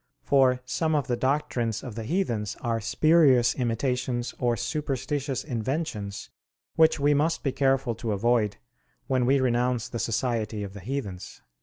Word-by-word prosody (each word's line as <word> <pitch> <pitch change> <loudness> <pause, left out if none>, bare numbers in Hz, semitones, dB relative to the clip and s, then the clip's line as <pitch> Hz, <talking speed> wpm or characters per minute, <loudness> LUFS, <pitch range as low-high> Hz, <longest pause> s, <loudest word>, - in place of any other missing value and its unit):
For 130 -2 +3
some 155 +4 0
of 145 -3 +1
the 125 - 0
doctrines 125 -4 -1
of 125 - -6
the 110 0 -6
heathens 115 - -1
are 115 -2 -1
spurious 130 0 +4
imitations 125 0 -1
or 120 -1 +1
superstitious 135 +1 -2
inventions, 120 -5 -4 0.4
which 160 -1 +4
we 145 +1 +3
must 150 +3 +1
be 135 - +1
careful 135 -2 +1
to 115 0 -4
avoid 110 0 +1 0.5
when 130 -2 +1
we 135 +1 +4
renounce 125 -1 0
the 120 - -4
society 115 -2 -1
of 100 -1 -7
the 100 - -9
heathens." 100 -4 -6
125 Hz, 150 wpm, -26 LUFS, 115-140 Hz, 0.5 s, spurious